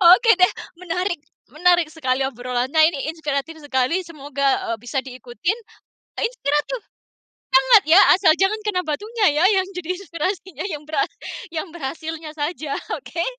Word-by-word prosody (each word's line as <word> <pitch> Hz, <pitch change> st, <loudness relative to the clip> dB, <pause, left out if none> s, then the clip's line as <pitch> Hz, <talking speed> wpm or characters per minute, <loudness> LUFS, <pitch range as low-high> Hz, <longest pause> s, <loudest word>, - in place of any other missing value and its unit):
Oke, 455 Hz, +3 st, +4 dB
deh, 365 Hz, -, +5 dB, 0.3 s
menarik. 360 Hz, -1 st, -2 dB, 0.3 s
Menarik 345 Hz, +2 st, +3 dB
sekali 265 Hz, -4 st, -1 dB
obrolannya 260 Hz, +5 st, +1 dB
ini 280 Hz, +2 st, -3 dB
inspiratif 315 Hz, 0 st, -3 dB
sekali, 290 Hz, +5 st, 0 dB
semoga, 280 Hz, -5 st, -1 dB
eee, 230 Hz, -, -1 dB
bisa 245 Hz, +4 st, -3 dB
diikutin 260 Hz, -, -4 dB, 0.6 s
inspiratif. 445 Hz, -, -1 dB, 0.7 s
Sangat, -, -, +6 dB
ya, 340 Hz, -, +8 dB, 0.2 s
asal 365 Hz, -4 st, +5 dB
jangan 395 Hz, +3 st, +2 dB
kena 370 Hz, -4 st, 0 dB
batunya, 420 Hz, +8 st, -1 dB, 0.2 s
ya, -, -, +6 dB
yang 375 Hz, -, -1 dB
jadi 360 Hz, 0 st, -3 dB
inspirasinya 370 Hz, +1 st, -4 dB
yang 300 Hz, -2 st, -5 dB
berhas 365 Hz, +7 st, 0 dB, 0.4 s
yang 330 Hz, +3 st, -4 dB
berhasilnya 320 Hz, +1 st, -5 dB
saja, 295 Hz, -1 st, -3 dB, 0.2 s
oke. 340 Hz, -1 st, -4 dB
320 Hz, 135 wpm, -22 LUFS, 280-365 Hz, 0.7 s, ya